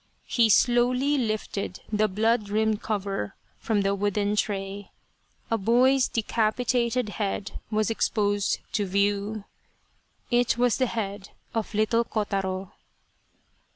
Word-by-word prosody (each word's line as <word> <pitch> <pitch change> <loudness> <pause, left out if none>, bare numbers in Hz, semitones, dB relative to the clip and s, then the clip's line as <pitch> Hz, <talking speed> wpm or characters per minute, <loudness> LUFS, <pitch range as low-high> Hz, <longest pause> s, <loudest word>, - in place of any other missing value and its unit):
He 230 -2 +3
slowly 250 +5 +3
lifted 215 -6 -2
the 215 +1 +3
blood 215 +2 +1
rimmed 215 0 +1
cover 195 - -3 0.2
from 215 -3 0
the 195 0 +1
wooden 205 +1 0
tray. 200 -1 -2 0.6
A 225 - +2
boy's 250 +5 +4
decapitated 235 +1 0
head 200 0 -3
was 215 0 +1
exposed 205 -2 0
to 205 -2 0
view. 200 +2 0 0.9
It 240 -1 +3
was 245 -1 +2
the 255 - +2
head 205 -3 -4 0.2
of 225 -1 -3
little 225 +2 +2
Kotaro. 195 -4 -2
215 Hz, 115 wpm, -26 LUFS, 200-235 Hz, 0.9 s, boy's